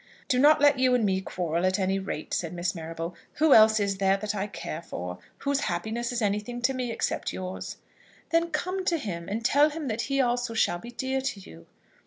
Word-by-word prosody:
"Do 250 - +2
not 300 +3 +6
let 285 -2 +5
you 255 -1 +4
and 235 -3 +2
me 190 -1 +1
quarrel, 170 -2 -2
at 185 +1 +2
any 195 0 +1
rate," 190 -5 -5
said 170 -1 -2
Miss 175 0 -1
Marrable. 165 +1 -5 0.2
"Who 310 -2 +4
else 220 0 +7
is 200 -1 -1
there 195 0 +3
that 210 +1 -3
I 205 0 -2
care 165 -5 -6
for? 90 - -6 0.2
Whose 280 0 0
happiness 220 +7 -2
is 240 -2 -1
anything 210 +4 -1
to 265 +2 +3
me 250 -2 -2
except - - -2
yours?" 185 0 -6 0.5
"Then 335 0 +2
come 370 +2 -2
to 340 - +2
him, 180 - -5
and 220 +3 -3
tell 290 +5 +5
him 300 -2 -5
that 225 +1 -1
he 275 0 +1
also 245 -2 +1
shall 175 -5 +2
be 235 - -9
dear 265 +2 -2
to 260 -6 -3
you." 80 - -14
220 Hz, 220 wpm, -27 LUFS, 185-260 Hz, 0.5 s, else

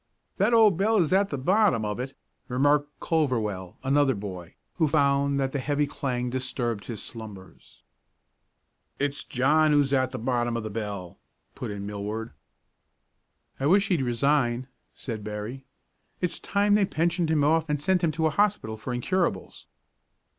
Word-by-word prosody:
"That - - +3
old 220 -6 +5
bell 215 +4 +2
is 175 -3 +2
at 195 +1 +3
the 140 - -3
bottom 180 - +2
of 105 +2 -3
it," 130 +2 -5 0.3
remarked 145 +3 +2
Culverwell, 110 - -1
another 135 -1 +3
boy, 95 -4 -7 0.2
who 160 -3 +3
found 140 -1 +2
that 135 -1 0
the 140 - -2
heavy 145 +2 0
clang 125 -3 -3
disturbed 120 -4 -2
his 110 -4 -5
slumbers. 105 -6 -11 1.1
"It's 140 0 -1
John 150 +5 +3
who's 145 -2 +3
at 130 -1 +2
the - - -4
bottom 120 0 0
of 115 - -4
the 110 - -5
bell," 100 -5 -5 0.3
put - - -6
in 100 -1 -5
Millward. 105 +2 -4 1.3
"I 135 - +1
wish 200 +4 +4
he'd 175 -7 +2
resign," 125 0 +1 0.3
said 110 -5 -5
Berry. 105 +5 -6 0.5
"It's 180 -2 -2
time 205 0 +1
they 205 -1 +4
pensioned 170 -1 0
him 155 -2 +2
off 160 +2 +2
and 150 -1 0
sent 180 +4 +1
him 165 - +3
to 160 0 0
a 155 - +3
hospital 200 - 0
for 125 +3 -4
incurables." 170 - -2
135 Hz, 160 wpm, -26 LUFS, 115-160 Hz, 1.3 s, old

